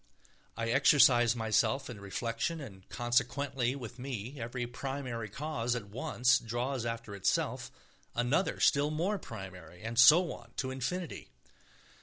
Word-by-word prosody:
I 115 Hz, 0 st, -1 dB
exercise 120 Hz, -3 st, +5 dB
myself 115 Hz, +4 st, +1 dB
in 115 Hz, -5 st, -8 dB
reflection, 115 Hz, -, -2 dB
and 100 Hz, -9 st, -11 dB
consequently 125 Hz, +1 st, 0 dB
with 125 Hz, -2 st, -8 dB
me 130 Hz, 0 st, -5 dB
every 120 Hz, +2 st, -3 dB
primary 125 Hz, -2 st, -5 dB
cause 125 Hz, -1 st, -2 dB
at 105 Hz, -4 st, -5 dB
once 120 Hz, +2 st, +2 dB
draws 120 Hz, +2 st, -2 dB
after 115 Hz, -2 st, -5 dB
itself 100 Hz, -1 st, -1 dB, 0.5 s
another 120 Hz, +10 st, +1 dB
still 145 Hz, -1 st, +4 dB
more 175 Hz, +7 st, -1 dB
primary, 95 Hz, -, -10 dB
and 115 Hz, +1 st, -2 dB
so 160 Hz, +9 st, +7 dB
on -, -, -13 dB
to 130 Hz, -2 st, -2 dB
infinity. 145 Hz, -, -4 dB
120 Hz, 130 wpm, -32 LUFS, 115-140 Hz, 0.5 s, so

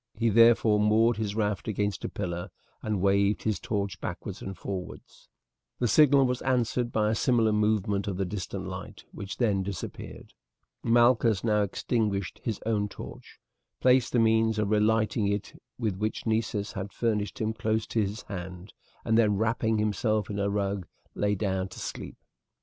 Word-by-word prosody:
He 115 Hz, +1 st, +1 dB
therefore 115 Hz, -1 st, +5 dB
moored 110 Hz, +2 st, +3 dB
his 105 Hz, -2 st, -2 dB
raft 105 Hz, -3 st, -1 dB
against 105 Hz, -1 st, -2 dB
a -, -, -2 dB
pillar 85 Hz, -3 st, -4 dB, 0.3 s
and 105 Hz, -4 st, -2 dB
waved 100 Hz, +1 st, +2 dB
his 110 Hz, -2 st, 0 dB
torch 100 Hz, -3 st, -3 dB
backwards -, -, -6 dB
and 95 Hz, 0 st, -6 dB
forwards. 95 Hz, -2 st, -7 dB, 0.5 s
The 120 Hz, -, +1 dB
signal 140 Hz, +3 st, +5 dB
was 125 Hz, 0 st, -1 dB
answered 125 Hz, -2 st, 0 dB
by 105 Hz, -1 st, +1 dB
a -, -, +1 dB
similar 115 Hz, -1 st, +2 dB
movement 105 Hz, -1 st, +1 dB
of 95 Hz, -3 st, -2 dB
the 95 Hz, -, 0 dB
distant 95 Hz, 0 st, -5 dB
light, 90 Hz, -1 st, -8 dB
which 100 Hz, -1 st, -7 dB
then 105 Hz, -6 st, +2 dB
disappeared. 95 Hz, -3 st, -7 dB, 0.5 s
Malchus 120 Hz, -3 st, +4 dB
now 105 Hz, -2 st, +2 dB
extinguished 100 Hz, -2 st, -1 dB
his 110 Hz, -4 st, -2 dB
own 105 Hz, -2 st, 0 dB
torch, -, -, -10 dB, 0.4 s
placed 125 Hz, -1 st, +4 dB
the -, -, +1 dB
means 110 Hz, -1 st, +3 dB
of 105 Hz, -1 st, 0 dB
relighting 110 Hz, 0 st, +2 dB
it 100 Hz, 0 st, -3 dB, 0.2 s
with 110 Hz, -6 st, -1 dB
which 110 Hz, +2 st, -3 dB
Nessus 110 Hz, -2 st, -1 dB
had 100 Hz, -1 st, -5 dB
furnished 105 Hz, -4 st, -1 dB
him 110 Hz, 0 st, -1 dB
close 110 Hz, -1 st, -1 dB
to 115 Hz, -, 0 dB
his 105 Hz, +3 st, -3 dB
hand, 90 Hz, 0 st, -8 dB, 0.3 s
and 115 Hz, +1 st, +3 dB
then, 105 Hz, -3 st, +3 dB
wrapping 110 Hz, +1 st, +1 dB
himself 105 Hz, 0 st, 0 dB
in 100 Hz, -, -3 dB
a 100 Hz, 0 st, +1 dB
rug, 100 Hz, -2 st, -2 dB, 0.3 s
lay 105 Hz, 0 st, 0 dB
down 95 Hz, -2 st, -1 dB
to 95 Hz, -, -11 dB
sleep. -, -, -6 dB
105 Hz, 165 wpm, -28 LUFS, 100-115 Hz, 0.5 s, therefore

